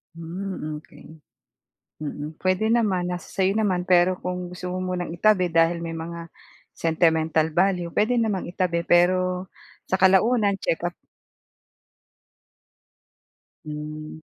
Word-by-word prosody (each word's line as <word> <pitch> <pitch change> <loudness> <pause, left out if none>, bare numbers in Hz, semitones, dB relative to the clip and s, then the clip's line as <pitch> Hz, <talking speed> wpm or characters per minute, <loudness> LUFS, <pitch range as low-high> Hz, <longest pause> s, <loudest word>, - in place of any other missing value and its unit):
Hmm, 165 -2 -5
okey. 150 -1 -15 0.9
Mm, 150 +1 -6
puwede 190 +4 +1
naman, 190 -6 +1
nasa 175 - -6
sa'yo 190 -1 +1
naman, 185 -4 +1
pero 180 0 +4
kung 180 0 -4
gusto 180 0 -6
mo 185 - -3
munang 175 -2 -3
itabi 180 -1 +2
dahil 165 +1 +2
may 165 - -4
mga 165 +1 -7 0.4
sentimental 160 -1 +1
value, 180 0 +1
puwede 225 +4 +2
namang 215 -6 0
itabi. 175 -1 0
Pero 185 +1 +3 0.4
sa 190 - -1
kalaunan 200 +2 +4
check-up 175 -1 -2 2.7
Hmm. 155 +1 -7
180 Hz, 115 wpm, -24 LUFS, 165-190 Hz, 2.7 s, pero